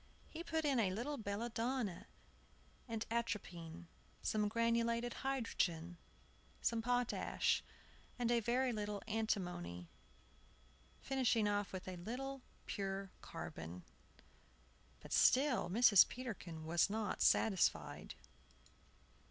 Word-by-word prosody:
He 330 +1 -5
put 320 -2 -1
in 275 -4 +3
a 205 -4 +3
little 240 +10 -3
belladonna 225 0 -2 0.8
and 225 -2 -3
atropine, 180 -7 -3 0.4
some 210 -1 +1
granulated 230 +1 +1
hydrogen, 180 -10 -1 0.6
some 230 -1 +1
potash, 245 +1 +1 0.5
and 240 -1 +1
a 240 - +4
very 245 +3 +1
little 210 -2 -3
antimony, 180 - -2 1.1
finishing 250 -5 +2
off 205 -1 0
with 185 -1 -6
a 185 -1 -5
little 260 +8 -5 0.2
pure 195 -1 -3
carbon. 85 +2 -7 1.2
But - - -7
still 255 -9 +4
Mrs. 210 -1 +7
Peterkin 185 -10 -6
was 170 +4 +3
not 215 -1 -2
satisfied. 120 - +2
220 Hz, 100 wpm, -38 LUFS, 185-240 Hz, 1.2 s, Mrs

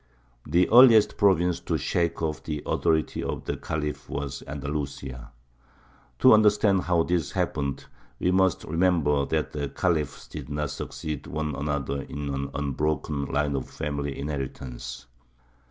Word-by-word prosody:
The 85 +4 +3
earliest 115 -3 +8
province 90 -4 +3
to - - -1
shake 85 -1 -1
off 75 -2 -2
the 75 -2 -4
authority 80 -1 +1
of - - -4
the - - -2
Khalif 75 -1 -4
was 70 -2 -4
Andalusia. 70 -3 -5 0.9
To - - +7
understand 105 -2 +4
how 85 -2 +3
this 85 -2 -1
happened, 70 -2 -2 0.3
we 90 - +2
must 95 -1 +2
remember 80 -4 +2
that - - -1
the 70 -2 -3
Khalifs 75 -5 -1
did - - -8
not 75 -1 -2
succeed 75 -3 -5
one 75 -2 -3
another 70 -1 -2
in 70 0 -5
one 70 0 -3
unbroken 75 0 -1
line 75 0 0
of 65 - -4
family 70 -1 -3
inheritance. 65 -4 -5
75 Hz, 140 wpm, -26 LUFS, 70-85 Hz, 0.9 s, earliest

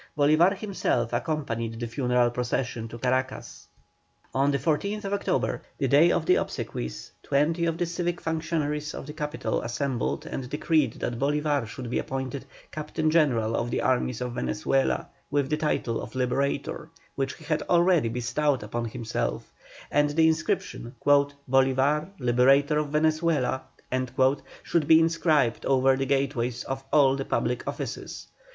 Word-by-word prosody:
Bolívar 155 +7 +4
himself 185 - -1
accompanied 120 -5 -2
the 120 - -2
funeral 125 0 +1
procession 120 -1 -2
to 115 - -9
Caracas. 130 +2 -2 0.7
On 135 +2 +2
the 140 - +2
14th 200 - -1
October, 200 0 -1 0.2
the 135 - 0
day 150 +7 +5
of 165 - 0
the 180 - +4
obsequies, 60 +1 -4
twenty 160 +5 +1
of 165 -1 -1
the 175 - 0
civic 175 0 -2
functionaries 155 -2 -2
of - - -7
the 150 - -8
capital 150 0 -2
assembled 125 +1 -2
and 125 -2 -5
decreed 150 0 +1
that 120 -1 -4
Bolívar 145 -2 +1
should 120 +3 -7
be - - +1
appointed 130 0 -4 0.3
Captain 155 +1 -1
General 120 -9 +2
of 120 - -1
the - - -1
armies 125 -2 0
of 125 -1 -3
Venezuela 130 +4 0 0.2
with 140 -1 0
the 150 - +2
title 150 -6 -1
of 115 - -9
"Liberator," 140 +4 -1 0.2
which 135 0 -2
he 160 - -15
had 155 0 -1
already 175 -7 +4
bestowed 125 +3 0
upon 115 +3 -3
himself, 110 - -3 0.4
and 145 0 +3
that - - -4
the 160 0 +5
inscription 155 -6 -1
"Bolívar, 140 +1 +2
Liberator 135 +4 +3
of 150 - -1
Venezuela" 155 -3 +1 1.0
should 160 -4 0
be 160 0 +8
inscribed 160 -6 +2
over 135 0 +4
the 135 0 -2
gateways 130 -3 0
of 135 0 -4
all 135 -3 +5
the 135 - -3
public 120 +1 -1
offices. - - -5
140 Hz, 150 wpm, -26 LUFS, 125-155 Hz, 1.0 s, be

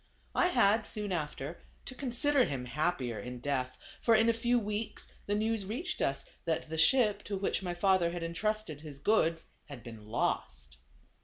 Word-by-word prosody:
I 360 - +4
had, 225 - +3
soon 210 -2 -3
after, 150 -2 -3 0.2
to - - -6
consider 265 +2 +2
him 130 -3 -3
happier 130 -4 -1
in 125 +4 -6
death; 130 -1 -2 0.2
for 230 - +5
in 225 +1 +5
a - - +5
few 240 +2 +2
weeks 210 0 -3
the 205 - +1
news 220 0 0
reached 260 - -3
us 135 - 0 0.2
that 160 -1 -1
the 160 - -2
ship, 215 +3 +4
to 200 - -2
which 195 - 0
my 175 -2 -3
father 185 -1 +3
had 175 0 -4
entrusted 190 -1 -2
his 150 -3 -9
goods, 165 -1 +2 0.2
had 140 -6 -10
been 110 -3 -10
lost. - - -2
185 Hz, 175 wpm, -32 LUFS, 145-220 Hz, 0.2 s, for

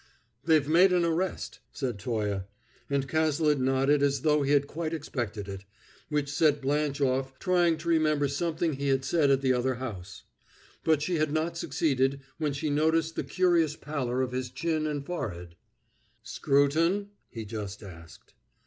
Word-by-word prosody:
"They've 155 -3 +3
made 175 +5 +5
an 175 -1 +3
arrest," 170 +3 -2
said 125 -7 -4
Toye; 105 -3 -2 0.4
and 140 -1 0
Cazalet 155 -1 +2
nodded 135 +2 +2
as 140 -2 +1
though 150 -1 +3
he 140 - -1
had 145 -1 +4
quite 160 +2 -4
expected 115 -9 -4
it, 100 0 -7 0.5
which 150 -2 0
set 150 -1 +3
Blanche 145 +1 -1
off 130 0 0
trying 175 -3 +2
to 160 +2 -9
remember 155 -3 +2
something 160 +3 -1
he 140 +1 -3
had 135 -1 +1
said 150 -1 +2
at 135 -1 +3
the 130 -1 +3
other 125 +1 0
house; 105 -7 -7 0.6
but 155 -2 +2
she 175 +2 0
had 155 -1 +1
not 160 +2 -1
succeeded 135 -5 0 0.2
when 150 -2 0
she 145 +2 -2
noticed 160 +2 +1
the - - -2
curious 170 -4 +2
pallor 130 -5 -2
of 125 - -3
his 125 0 -3
chin 155 +4 -1
and 145 -2 -3
forehead. 90 - -5 0.7
"Scruton?" 165 +9 +1 0.2
he 115 -2 -7
just 105 -1 -6
asked. 85 -5 -13
145 Hz, 165 wpm, -28 LUFS, 130-160 Hz, 0.7 s, made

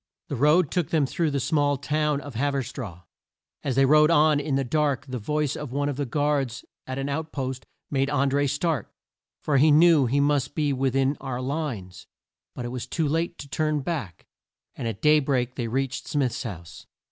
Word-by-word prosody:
The 145 - -2
road 150 +5 +3
took 175 -4 0
them 155 -4 +2
through 160 +4 0
the 140 -1 -1
small 145 +1 +1
town 150 +1 0
of 145 -2 -9
Hav 140 +5 0
er 135 - 0
straw. 115 - -8 0.6
As 135 -3 -1
they 135 0 +5
rode 150 +2 +5
on 155 -2 +4
in 145 -1 -1
the 135 - +1
dark 145 0 0
the 130 -2 -5
voice 150 +5 -1
of 150 -4 -6
one 145 +2 0
of 145 - -2
the 140 0 -3
guards 145 -3 -1 0.2
at 130 0 -4
an 135 0 -2
out 160 +3 -3
post 130 -2 -4 0.2
made 135 -1 +1
An 140 -1 +2
dré 145 0 +2
start, 145 - -1 0.5
for 145 -2 +2
he 150 +4 +5
knew 155 -2 +6
he 140 +4 +1
must 145 -2 +1
be 150 -3 +1
with 135 0 0
in 135 +1 +2
our 125 -2 -4
lines. 130 - -4 0.5
But 125 - -5
it - - -3
was 125 -1 -5
too 160 -3 -1
late 165 +3 -1
to 140 - -9
turn 155 +1 0
back, 130 - -5 0.5
and 115 - -4
at 110 -1 -5
day 150 0 +6
break 130 -3 0
they 120 -2 -3
reached 130 +2 -2
Smith's 130 -5 -1
house. 85 -9 -8
140 Hz, 210 wpm, -25 LUFS, 130-150 Hz, 0.6 s, knew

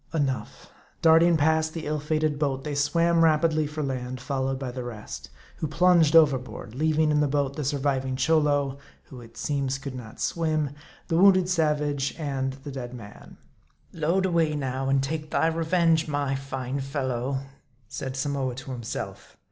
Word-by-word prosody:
Enough: 140 -4 -2 0.3
darting 165 +1 +6
past 160 +1 +2
the 165 - -4
ill 150 0 -1
fated 155 0 0
boat, 135 -3 -1
they 150 - -4
swam 165 +4 +2
rap 155 0 +4
idly 155 -2 +1
for 150 +1 -4
land, 130 -2 -4
followed 135 0 -2
by 130 -2 -4
the 125 0 -5
rest; 115 -3 -8 0.3
who 155 - -2
plunged 165 0 +4
overboard, 130 -7 +3
leaving 155 +2 +2
in 150 - +3
the 150 - +3
boat 140 -1 0
the 150 - -3
surviving 135 -2 0
Cholo 145 -2 +2 0.2
who 125 -2 -12
it 115 -1 -15
seems 140 -2 -1
could 140 -1 -7
not 120 -4 -9
swim 155 -4 0 0.4
the 165 - +1
wounded 185 -1 +6
savage, 150 -5 0
and 135 -4 -2
the 145 - -6
dead 125 -2 -6
man. 105 -4 -12 0.6
"Load 170 +4 +1
away 165 -4 +1
now, 135 -1 -2
and 135 0 +2
take 155 +2 -3
thy - - +1
revenge, 165 0 +2
my 145 -2 -1
fine 135 -1 -4
fellow," 135 -1 -2 0.5
said 130 +4 -5
Samoa 135 -2 -1
to 135 +1 -8
himself. 120 -2 -6
145 Hz, 165 wpm, -26 LUFS, 135-160 Hz, 0.6 s, darting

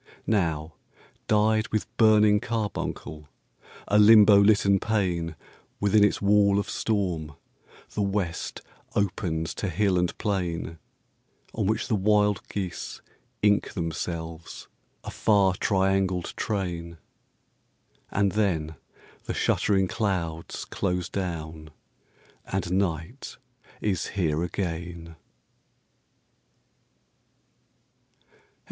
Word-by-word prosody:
Now, 80 -7 0 0.5
dyed 110 0 +2
with 110 - -1
burning 105 -2 +5
carbuncle, 105 -9 -4 0.6
a 105 - +4
Limbo 105 -1 +8
litten 100 -1 +4
pane, 90 -7 -1 0.4
Within 105 +1 +4
its 105 - +2
wall 100 0 +4
of 100 - -1
storm, 90 -9 -2 0.6
the 105 - -2
West 100 -4 -2 0.3
opens 85 -5 -1
to 100 - -3
hill 95 +1 +1
and 90 0 -1
plain, 85 -5 -2 0.7
On - - -1
which 110 +1 0
the 120 - -1
wild 105 0 +2
geese 95 -4 -5 0.4
ink 105 -1 +2
themselves, 80 -1 -5 0.4
a - - -6
far 100 -3 +3
triangled 95 -2 0
train; 85 -5 -3 1.1
And 100 -1 +1
then 80 -8 -1 0.5
the - - -3
shuttering 95 -2 +2
clouds 90 -7 -3
close 90 -2 -2
down 80 -4 -5 0.8
and 95 -2 -2
night 90 - -2 0.4
is 95 -5 -1
here 80 -5 -1
again. 85 -2 -4
95 Hz, 90 wpm, -26 LUFS, 85-105 Hz, 1.1 s, Limbo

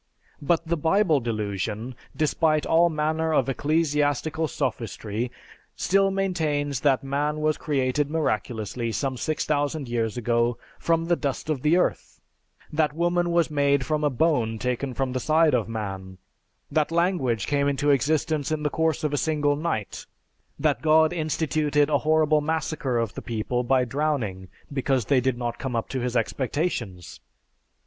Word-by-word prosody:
But 165 +3 +1
the 170 +1 0
Bible 160 0 +3
Delusion 110 0 -3 0.2
despite 155 0 +1
all 170 +1 +4
manner 160 +1 0
of 135 - +2
ecclesiastical 150 +1 0
sophistry 120 -4 -3 0.5
still 195 +1 +2
maintains 155 -8 -1
that 135 -2 +2
man 145 +2 -1
was 155 0 +1
created 140 -1 0
miraculously 115 -6 -2
some 135 +3 -2
6000 145 0 -1
years 115 -1 -1
ago 120 0 +1 0.2
from 165 0 +1
the 175 +1 +2
dust 145 0 -3
of 140 -5 -2
the 155 +5 +3
earth, 180 - -1 0.5
that 150 -1 +1
woman 175 +1 +1
was 170 -2 +2
made 140 -2 +2
from 155 -1 -1
a 150 - +3
bone 125 -5 +1
taken 125 +2 -2
from 135 -2 -1
the 130 - -1
side 155 +3 +3
of 115 -3 +1
man, 95 -4 -5 0.5
that 155 -1 +1
language 165 - +1
came 140 -1 +1
into 145 +1 +2
existence 150 +2 +1
in 155 -1 -1
the 150 - 0
course 160 -1 0
of 150 -1 0
a - - +1
single 145 -1 +1
night, 145 - -3 0.5
that 145 -6 +1
God 160 +1 +4
instituted 155 -2 0
a 145 - +3
horrible 155 -1 +3
massacre 155 -4 -1
of 115 -3 -1
the - - -6
people 120 +2 -2
by 130 0 +2
drowning 125 -9 -2 0.3
because 135 -3 0
they 135 0 +3
did 130 -1 0
not 120 -1 -3
come 130 -3 -3
up 115 - -2
to 130 - -2
his 125 0 -1
expectations. 115 - -2
145 Hz, 155 wpm, -25 LUFS, 125-155 Hz, 0.5 s, all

